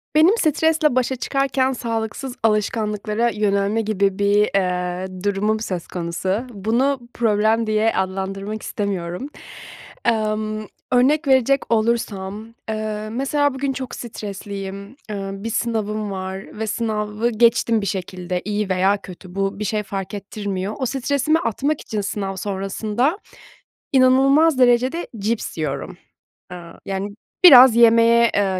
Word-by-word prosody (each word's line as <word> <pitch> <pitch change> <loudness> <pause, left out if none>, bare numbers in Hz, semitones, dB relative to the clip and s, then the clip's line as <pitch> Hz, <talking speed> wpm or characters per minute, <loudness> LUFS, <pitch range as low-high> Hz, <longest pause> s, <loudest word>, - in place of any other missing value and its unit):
Benim 345 +9 +5
stresle 315 - +2
başa 255 +1 +1
çıkarken 265 0 0
sağlıksız 230 +2 -4
alışkanlıklara 215 +1 0
yönelme 205 0 0
gibi 200 -2 0
bir, 205 +1 +3
eee, 180 0 -2
durumum 205 +2 0
söz 185 -6 -4
konusu. 185 +6 -2
Bunu 240 +6 0
problem 220 0 +2
diye 215 +1 +2
adlandırmak 195 +2 -3
istemiyorum. 195 +4 -3 0.8
Emm, 215 -1 0 0.3
örnek 280 +5 +3
verecek 265 0 +3
olursam, 215 -3 -1 0.2
eee, 215 0 -3
mesela, 275 +3 0
bugün 270 +1 -2
çok 260 -1 -6
stresliyim. 200 -3 -7 0.2
Eee, 195 -2 -4
bir 200 +3 -5
sınavım 215 -2 -2
var 190 +2 -6
ve 220 - -2
sınavı 215 0 -1
geçtim 230 -1 +3
bir - - -3
şekilde. 180 -1 -3
İyi 210 -1 -2
veya 190 +2 +2
kötü 185 -1 -11
bu 195 0 -1
bir - - -2
şey 210 +1 -1
fark 195 0 -5
ettirmiyor. 200 -1 -4
O 260 - 0
stresimi 280 +4 +1
atmak 280 +4 -1
için 215 -1 -3
sınav 195 -1 -3
sonrasında 210 - -1 0.8
inanılmaz 270 +3 +5
derecede 255 +6 +3
cips 215 -2 -2
yiyorum. 150 -3 -3 0.6
Eee, 180 - -6 0.3
yani, 195 +1 -3 0.4
biraz 260 -8 +10
yemeye, 230 0 +5
eee, 190 -2 +1
215 Hz, 125 wpm, -21 LUFS, 195-245 Hz, 0.8 s, biraz